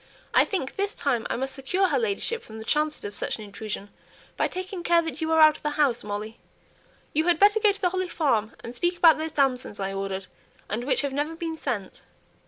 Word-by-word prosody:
"I - - +6
think 360 -10 -3
this 400 +1 -1
time 245 -5 0
I - - 0
must 265 +2 -3
secure 360 +8 0
her - - +2
ladyship 455 +1 0
from 220 - -11
the 220 - -8
chances 300 +1 0
of 205 - -5
such - - 0
an 215 - -8
intrusion, 205 0 -6 0.5
by - - +1
taking 370 0 -5
care 340 -1 +3
that 325 -2 -5
you 320 0 -1
are 320 - +4
out 310 -1 +7
of - - -23
the 300 - -1
house, 270 -6 +2
Molly. 210 +2 -5 0.7
You 315 +2 +2
had 350 -2 +4
better 410 +4 +5
go 425 -1 +5
to 400 - -8
the 360 - +3
Holly 370 -1 -2
Farm, 230 -11 0
and 235 - -7
speak 350 +7 0
about 325 -3 +6
those 320 0 -3
damsons 255 -7 0
I 195 0 -2
ordered, 195 -1 -3 0.4
and 230 +4 -3
which 260 -2 +2
have 280 -2 -2
never 295 +3 -2
been 330 -1 -4
sent." 205 -11 -4
295 Hz, 230 wpm, -26 LUFS, 225-345 Hz, 0.7 s, out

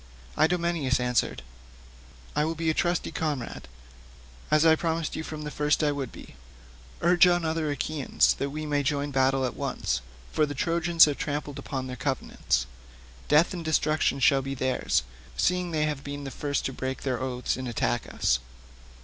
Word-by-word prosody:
Idomeneus 165 -5 +1
answered, 125 - 0 0.9
"I 150 - +2
will 160 +2 -1
be 165 0 +1
a - - -1
trusty 175 +2 0
comrade, 150 -6 -3 0.8
as 155 +1 +4
I 160 -1 +7
promised 165 -1 -2
you - - -3
from 155 -1 -6
the 150 - -5
first 150 +1 +1
I 150 - +3
would 140 -4 -4
be. - - -12 0.7
Urge 175 +1 +6
on 175 -1 +2
the - - 0
other 160 -1 -1
Achaeans, 145 0 +1
that 140 - -1
we 155 +2 -5
may 145 -1 +1
join 145 +1 -1
battle 135 0 +2
at 125 - -3
once, - - -2 0.3
for 155 - +2
the 145 - -5
Trojans 170 +2 +4
have 145 -2 -2
trampled 145 -1 -3
upon 130 -2 -4
their 130 0 -5
covenants. 130 - -1 0.6
Death 150 +5 +4
and 175 -2 -5
destruction 155 -3 +1
shall 135 +1 +4
be 135 +1 -4
theirs, 130 - 0 0.3
seeing 180 0 +1
they 155 -2 +1
have 150 -2 -3
been 145 0 -6
the 135 - -5
first 145 +2 -2
to 135 - -2
break 130 +1 -4
their 130 -2 -1
oaths 125 -1 -1
and 130 0 -5
to - - -3
attack - - -1
us." 60 - +2
145 Hz, 185 wpm, -27 LUFS, 135-160 Hz, 0.9 s, I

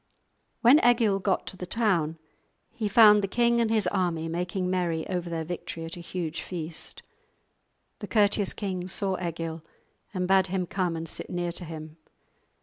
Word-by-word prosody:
When 260 +6 +6
Egil 230 -5 +4
got 190 0 0
to 190 - -7
the 180 - -6
town 175 -8 +1 0.5
he 225 -3 -3
found 210 0 +7
the 195 - -1
king 235 +3 +2
and 230 - +1
his 220 -3 +2
army 175 -3 0
making 180 +2 -2
merry 175 -3 -1
over 180 -2 -3
their 165 -1 -2
victory 165 0 -6
at 165 +3 -7
a - - -9
huge 170 -2 -4
feast. 165 -2 -5 1.0
The - - -6
courteous 205 -2 +2
king 185 -4 -4
saw 190 +1 -1
Egil 165 -1 -4 0.5
and 180 -2 -2
bade 190 0 +4
him 185 0 -1
come 180 -2 -1
and 165 0 -5
sit - - -4
near 175 -1 -2
to 175 - -5
him. 155 -1 -8
180 Hz, 170 wpm, -27 LUFS, 165-205 Hz, 1.0 s, found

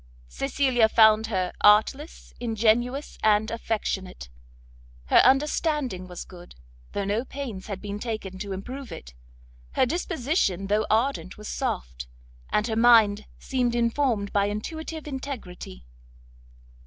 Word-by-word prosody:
Cecilia 230 - +1
found 220 0 +5
her 185 -4 -1
artless, 220 +9 +3
ingenuous, 240 +4 0
and 215 0 +3
affectionate; 195 - -3 0.8
her - - +5
understanding 270 - +2
was 180 -1 -8
good, 175 -1 -13 0.4
though 200 - -2
no 210 +4 0
pains 255 -8 -7
had 200 -3 -5
been 205 0 -6
taken 210 -5 -5
to 200 0 -5
improve 250 +8 -6
it; 60 0 -9 0.6
her - - +3
disposition 275 - -1
though 210 +2 +1
ardent 225 -3 0
was 210 0 -9
soft, - - -4 0.4
and 210 - +1
her 225 -2 -2
mind 220 -3 +5
seemed 245 -3 -1
informed 235 -3 0
by 200 -1 +3
intuitive 315 +10 -5
integrity. 235 - -7
220 Hz, 120 wpm, -26 LUFS, 200-260 Hz, 0.8 s, found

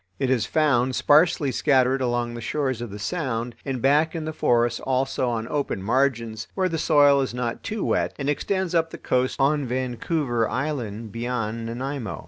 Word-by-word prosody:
It 130 +4 0
is 115 -4 +1
found 130 -5 +2
sparsely 150 -1 +4
scattered 130 0 +2
along 120 -1 -1
the 120 - -6
shores 130 0 -2
of 120 - -5
the 100 - -7
Sound 120 - -3
and 130 -4 -4
back 150 +4 +3
in 160 -2 -3
the 155 - -4
forests 120 -4 +2
also 130 -1 0
on 115 -1 -2
open 140 -9 -2
margins, 115 -2 0
where 190 -1 +1
the 165 -2 -2
soil 145 -3 +5
is 130 -2 -3
not 120 -1 -3
too 215 -1 -3
wet, - - 0
and 140 - -4
extends 190 +5 -1
up 165 -1 +2
the - - -8
coast 125 0 0
on 140 0 +2
Vancouver 125 0 -1
Island 120 -6 -3
beyond 115 -1 -3
Nanaimo. 125 -1 -4
130 Hz, 180 wpm, -24 LUFS, 120-145 Hz, -, soil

